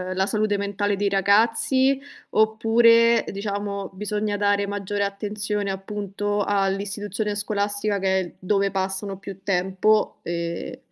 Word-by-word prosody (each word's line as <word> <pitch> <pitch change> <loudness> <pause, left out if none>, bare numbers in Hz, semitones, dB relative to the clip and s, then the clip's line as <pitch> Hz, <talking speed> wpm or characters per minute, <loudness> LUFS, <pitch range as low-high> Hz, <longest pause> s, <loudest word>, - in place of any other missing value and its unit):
la 190 +1 +2
salute 215 0 0
mentale 200 0 -1
dei 200 0 0
ragazzi, 230 +7 +3 0.3
oppure 230 +1 +4
diciamo 200 -1 -4
bisogna 210 +1 -2
dare 205 0 +1
maggiore 205 0 -2
attenzione, 205 0 -2
appunto 205 +1 -3
all'istituzione 205 +1 -1
scolastica 205 0 -1
che 190 0 +2
è 175 - -7
dove 195 +1 +1
passano 195 +1 -2
più 195 0 -9
tempo, 190 +3 +1
ehm 170 0 -4
205 Hz, 115 wpm, -24 LUFS, 195-210 Hz, 0.3 s, oppure